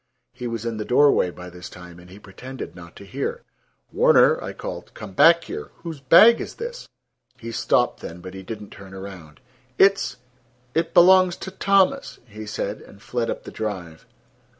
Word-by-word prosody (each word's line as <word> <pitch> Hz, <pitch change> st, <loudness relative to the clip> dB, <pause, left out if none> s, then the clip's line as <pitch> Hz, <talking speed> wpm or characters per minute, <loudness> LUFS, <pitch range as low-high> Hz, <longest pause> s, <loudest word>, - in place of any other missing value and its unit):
He 125 Hz, -1 st, -6 dB
was 115 Hz, -1 st, -5 dB
in 115 Hz, -1 st, -3 dB
the 105 Hz, -, -3 dB
doorway 130 Hz, -5 st, +4 dB
by 90 Hz, 0 st, -10 dB
this 90 Hz, 0 st, -10 dB
time, 90 Hz, -1 st, -12 dB
and 90 Hz, +1 st, -16 dB
he 95 Hz, -, -13 dB
pretended 125 Hz, +6 st, -9 dB
not 85 Hz, -1 st, -13 dB
to 100 Hz, -, -12 dB
hear. 95 Hz, -, -4 dB, 0.5 s
"Warner," -, -, +4 dB
I -, -, -5 dB
called, -, -, -8 dB
"come 95 Hz, -, -9 dB
back 170 Hz, -, +6 dB
here. -, -, -7 dB
Whose 165 Hz, -4 st, -6 dB
bag 175 Hz, -, +7 dB
is -, -, -7 dB
this?" 480 Hz, +2 st, -7 dB, 0.5 s
He 115 Hz, -1 st, -8 dB
stopped -, -, +1 dB
then, 85 Hz, -, -8 dB
but 90 Hz, +1 st, -10 dB
he 95 Hz, -, -8 dB
did 105 Hz, +3 st, -7 dB
not 105 Hz, -, -12 dB
turn 95 Hz, -1 st, -12 dB
around. 95 Hz, -5 st, -10 dB, 0.4 s
"It's—it 125 Hz, -3 st, -1 dB
belongs 185 Hz, 0 st, +6 dB
to 190 Hz, -, -8 dB
Thomas," 195 Hz, +8 st, +1 dB
he 110 Hz, -2 st, -10 dB
said, 105 Hz, 0 st, -4 dB
and 100 Hz, -, -16 dB
fled 120 Hz, +2 st, -3 dB
up -, -, -4 dB
the -, -, -9 dB
drive. 90 Hz, -7 st, -6 dB
115 Hz, 180 wpm, -23 LUFS, -, 0.5 s, bag